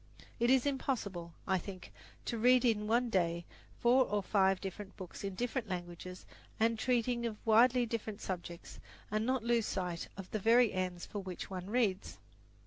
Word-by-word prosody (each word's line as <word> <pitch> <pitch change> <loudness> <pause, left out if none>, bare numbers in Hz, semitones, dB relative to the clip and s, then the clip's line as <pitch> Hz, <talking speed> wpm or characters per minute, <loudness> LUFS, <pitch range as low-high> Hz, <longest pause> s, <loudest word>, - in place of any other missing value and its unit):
It 235 +1 +3
is 260 0 +5
impossible, 210 -11 -2
I 190 -1 +2
think, 185 0 -9 0.3
to 230 - -2
read 250 +2 +5
in 210 -3 +2
one 235 +2 +2
day 170 -3 +1 0.3
four 250 +2 +5
or 205 -2 -1
five 190 -1 +3
different 195 +1 -7
books 185 0 -8
in 195 -1 -3
different 240 0 -2
languages 180 0 -6 0.3
and 225 0 +2
treating 240 -1 +1
of 215 -2 -5
widely 240 +3 +5
different 220 -2 -4
subjects, 175 -3 -6 0.3
and 215 +2 0
not 260 -2 +1
lose 235 -1 +2
sight 180 -3 -3
of 195 -2 -8
the 215 - -1
very 230 +2 +5
ends 180 -1 -2
for 205 - -5
which 185 -1 -6
one 185 0 -5
reads. 215 -5 0
210 Hz, 170 wpm, -34 LUFS, 185-235 Hz, 0.3 s, is